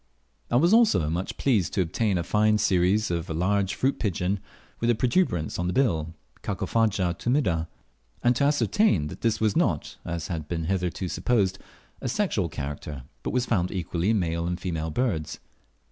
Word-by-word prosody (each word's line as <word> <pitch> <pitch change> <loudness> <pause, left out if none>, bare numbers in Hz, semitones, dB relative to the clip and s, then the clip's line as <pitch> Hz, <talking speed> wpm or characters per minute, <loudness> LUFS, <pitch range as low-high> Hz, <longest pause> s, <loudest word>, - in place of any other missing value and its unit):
I - - 0
was 170 - +4
also 220 - +4
much 90 +3 -3
pleased 110 -10 +1
to 100 - +2
obtain 95 +3 0
a 85 - -1
fine 105 +4 +3
series 95 +1 +2
of 85 -1 -2
a 80 - -2
large 95 +3 +1
fruit 135 +2 0
pigeon 95 -1 -1 0.4
with 115 - +1
a 120 - +4
protuberance 120 - 0
on 90 - 0
the 90 - -1
bill 80 - +1 0.3
(Carpophaga 100 -6 0
tumida), 90 - 0 0.6
and 120 +1 +4
to 140 - +2
ascertain 145 - +2
that - - -9
this 115 -2 +1
was 110 -2 +1
not, - - 0
as 85 -1 -4
had 80 -5 -4
been 85 0 -2
hitherto 90 +1 -1
supposed, 100 -1 0 0.4
a 130 - -2
sexual 115 - 0
character, 70 -2 -6 0.2
but - - -3
was 125 0 0
found 90 -8 +1
equally 90 0 -2
in 110 - +3
male 85 -2 -1
and 90 +1 -2
female 80 -3 -3
birds. 80 - -1
95 Hz, 175 wpm, -26 LUFS, 85-115 Hz, 0.6 s, was